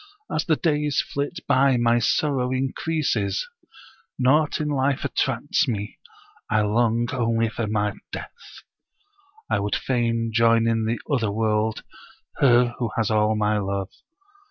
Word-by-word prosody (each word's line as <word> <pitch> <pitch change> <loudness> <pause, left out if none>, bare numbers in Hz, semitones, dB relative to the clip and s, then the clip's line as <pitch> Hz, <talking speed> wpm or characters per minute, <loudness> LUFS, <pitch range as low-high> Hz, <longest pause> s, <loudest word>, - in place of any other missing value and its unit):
As - - -1
the 160 - +3
days 150 -2 0
flit 145 +5 -3
by 135 -1 +4
my 120 0 +3
sorrow 130 +1 +1
increases; 130 -6 -1 0.7
naught 145 +4 +2
in 150 - -1
life 140 -1 0
attracts 135 +5 0
me; 105 -4 -4 0.5
I 110 - +2
long 115 +2 +1
only 115 -2 +1
for 115 0 -3 0.4
death. 475 - -10 0.8
I - - 0
would 100 +1 -1
fain 115 -2 -1
join 115 0 +4
in 115 -1 +1
the 115 +2 -1
other 120 -8 0
world 110 0 0 0.5
her 120 -2 +4
who 120 -3 -1
has 110 -1 +1
all 110 0 +2
my 105 0 +1
love. 100 -1 -3
120 Hz, 130 wpm, -23 LUFS, 110-135 Hz, 0.8 s, by